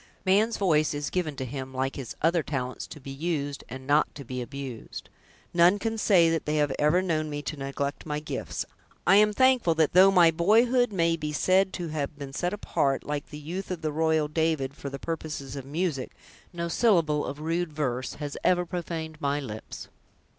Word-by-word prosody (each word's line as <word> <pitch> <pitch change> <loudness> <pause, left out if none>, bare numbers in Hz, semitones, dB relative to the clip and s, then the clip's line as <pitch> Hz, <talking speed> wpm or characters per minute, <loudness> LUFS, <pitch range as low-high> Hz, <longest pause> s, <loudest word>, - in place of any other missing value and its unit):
"Man's 210 +5 +3
voice 155 -6 +2
is 145 -1 -3
given 165 -5 -1
to 130 - -4
him, 130 +1 -6
like 135 +1 -1
his 130 -5 -6
other 170 +1 +3
talents, 130 -4 -4
to - - -10
be 135 0 -8
used, 145 -1 -3
and 130 +1 -8
not 145 +2 +2
to 140 - -8
be 125 +1 -4
abused. 130 -2 -7 0.4
None 175 +3 +5
can 225 +2 -2
say 170 -6 +4
they 150 0 -2
have 145 -2 +2
ever 160 +5 +3
known 155 -4 -1
me 145 0 -4
to 155 - -4
neglect 140 +1 -4
my 150 -1 -2
gifts! 150 - -4 0.4
I 195 - +6
am 210 0 +5
thankful 250 -7 +3
that, 160 -2 +2
though 185 +2 +8
my 175 -4 +6
boyhood 230 +8 +3
may 170 -3 +2
be 150 -1 -3
said 185 +5 +3
to 175 -3 -4
have 150 -1 -3
been 140 -2 -7
set 175 +5 -1
apart, 140 -9 0
like 145 -1 -4
the 150 - -8
youth 170 +6 -6
of 175 -3 -5
the 155 - 0
royal 160 0 +2
David, 155 -3 0
for 140 - -7
the 140 - -6
purposes 150 -3 -5
of 135 -2 -6
music, 150 -3 -2 0.4
no 170 -1 -3
syllable 165 -6 +2
of 145 - -5
rude 165 +2 -1
verse 130 -4 -2
has 145 -1 -5
ever 180 -1 +3
profaned 165 -2 -5
my 140 +1 0
lips." 110 -6 -7
155 Hz, 195 wpm, -27 LUFS, 140-175 Hz, 0.4 s, though